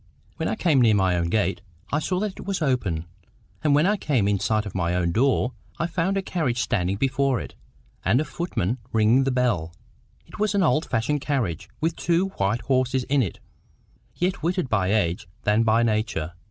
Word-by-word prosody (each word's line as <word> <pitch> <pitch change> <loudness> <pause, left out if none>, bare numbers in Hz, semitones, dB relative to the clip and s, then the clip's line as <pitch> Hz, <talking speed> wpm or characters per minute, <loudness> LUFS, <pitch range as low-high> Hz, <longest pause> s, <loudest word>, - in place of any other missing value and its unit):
When - - -1
I - - -1
came 160 -10 +3
near 110 -3 +5
my 95 -2 +2
own 85 -1 0
gate, 95 -3 0 0.3
I 145 - +2
saw 180 +3 -1
that 210 -1 -1
it - - -9
was 195 -2 -1
open; 110 - 0 0.6
and 150 -2 +4
when 150 +3 +4
I 210 +2 +2
came 130 - +1
in 100 -1 +1
sight 110 +1 0
of 100 - -6
my 85 -1 0
own 85 -1 +1
door, 125 +3 +2 0.2
I - - 0
found 175 +3 0
a 195 - -1
carriage 155 -11 -1
standing 95 -6 0
before 135 0 +1
it, - - -8 0.5
and 110 +7 +3
a 155 - 0
footman 130 - -2
ringing 115 +4 +4
the - - +2
bell. 105 -11 0 0.5
It - - -13
was 210 -1 +1
an 195 - +3
old 155 -1 +2
fashioned 135 +6 0
carriage, 125 - -2
with 165 +1 0
two 175 +3 +1
white 100 +5 0
horses 130 -1 +1
in 140 0 +3
it, 100 - -2 0.8
yet 180 +1 0
whiter 180 +3 0
by 100 -7 0
age 90 -6 0 0.2
than 105 +2 +3
by 115 +1 +3
nature. 105 -8 -1
125 Hz, 200 wpm, -24 LUFS, 100-155 Hz, 0.8 s, near